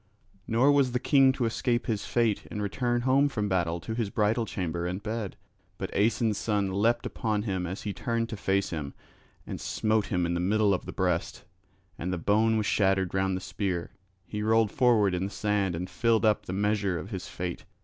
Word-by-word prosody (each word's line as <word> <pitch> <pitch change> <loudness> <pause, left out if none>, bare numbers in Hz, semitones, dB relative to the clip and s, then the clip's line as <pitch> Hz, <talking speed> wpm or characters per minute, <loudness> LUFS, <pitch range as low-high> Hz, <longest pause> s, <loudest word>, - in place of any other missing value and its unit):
Nor 125 +6 +4
was 140 -3 +3
the 125 - +1
king 135 0 +5
to 130 -2 -1
escape 120 +1 0
his 110 -3 -2
fate 115 -4 +1
and 105 - -5
return 120 +4 0
home 135 +3 +3
from 105 -6 -2
battle 85 -3 0
to 100 +6 -5
his 115 -3 -1
bridal 110 +3 +1
chamber 85 -2 -3
and 90 +3 -4
bed. 110 -2 -3 0.4
But - - -5
Aeson's 110 0 +2
son 100 -3 0
leapt 115 +5 +1
upon 110 -3 -1
him 95 -4 -2
as 95 +3 -6
he 105 - -3
turned 115 +1 -1
to 110 - -4
face 100 -1 0
him, 75 -4 -5 0.5
and - - -6
smote 110 -1 0
him 90 -2 0
in 85 - -1
the 85 - -1
middle 100 +3 +2
of 90 - -3
the - - -4
breast, - - -1 0.6
and 90 +2 -2
the 90 - -1
bone 110 +6 +2
was 105 - 0
shattered 95 -3 +2
round 95 -1 +1
the - - -6
spear; 90 -1 -3 0.3
he 105 +1 -5
rolled 110 0 +3
forward 115 -7 +3
in 90 +1 -1
the - - -3
sand 100 -4 0
and 90 +2 -4
filled 115 +1 +1
up 105 -1 +2
the - - -3
measure 100 -2 0
of 85 +7 -7
his 95 -2 -5
fate. 90 -1 -5
105 Hz, 210 wpm, -28 LUFS, 95-115 Hz, 0.6 s, king